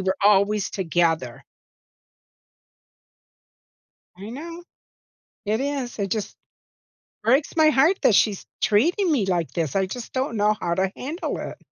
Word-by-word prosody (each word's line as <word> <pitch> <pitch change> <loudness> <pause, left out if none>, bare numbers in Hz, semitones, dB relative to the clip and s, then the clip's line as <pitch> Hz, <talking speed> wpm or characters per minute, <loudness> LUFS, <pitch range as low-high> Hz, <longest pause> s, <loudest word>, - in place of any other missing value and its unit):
were 190 0 0
always 205 0 +3
together. 165 - -1 2.7
I 195 +3 -9
know. 330 +8 -8 0.8
It 215 +2 0
is, 275 -4 -3
it 200 -2 -2
just 215 0 -3 0.9
breaks 265 +9 +2
my 315 -1 +5
heart 310 +6 +3
that 215 - +4
she's 205 -2 +2 0.2
treating 340 - +2
me 250 -10 +1
like 175 -4 -1
this, 160 -5 -2
I 195 -1 +2
just 235 +5 -7
don't 260 -2 -2
know 210 0 +2
how 170 - -1
to 190 +1 0
handle 310 +8 -4
it. - - -7
210 Hz, 135 wpm, -23 LUFS, 190-275 Hz, 2.7 s, my